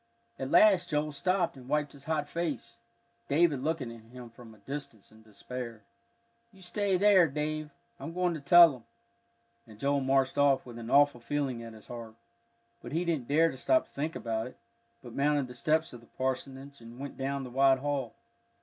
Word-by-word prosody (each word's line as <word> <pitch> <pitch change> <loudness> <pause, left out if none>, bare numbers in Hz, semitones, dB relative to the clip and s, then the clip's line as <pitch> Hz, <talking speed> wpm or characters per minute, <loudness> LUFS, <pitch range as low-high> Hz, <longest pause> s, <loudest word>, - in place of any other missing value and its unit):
At 135 - -3
last 185 -3 +5
Joel 150 -1 0
stopped 175 +4 0
and 130 -1 -13
wiped 150 0 0
his 140 -1 -15
hot 155 -2 -1
face, 160 -5 -4 0.5
David 150 -2 +2
looking 145 -5 -2
at 115 - -12
him 120 0 -11
from 115 -1 -14
a - - -21
distance 115 -2 -8
in 110 0 -18
despair. 115 +1 -8 0.7
"You 190 -2 -17
stay 195 +1 0
there, 195 -3 +6
Dave, 155 +1 -3 0.3
I'm 165 - -6
going 180 0 0
to 160 - -5
tell 165 +3 +7
'em," 125 -3 -12 0.8
and 110 -2 -14
Joel 140 +1 +1
marched 135 0 +1
off 140 -2 +3
with 120 -2 -9
an 115 0 -7
awful 145 -3 +4
feeling 130 -1 -2
at 115 -1 -9
his 110 -1 -15
heart. 115 -2 -9 0.7
But - - -9
he 170 +3 0
didn't 155 -8 -1
dare 160 +3 +3
to - - -10
stop 320 - +2
to - - -28
think 155 +4 -3
about 115 0 -3
it, 125 - -13 0.5
but - - -10
mounted 145 0 +1
the 125 - -10
steps 155 +6 0
of 120 - -9
the 115 - -20
parsonage 135 +1 -5
and 115 +1 -12
went 140 +1 -7
down 135 +1 -3
the 125 - -8
wide 135 +1 +4
hall. 135 -3 -3
140 Hz, 195 wpm, -30 LUFS, 125-155 Hz, 0.8 s, tell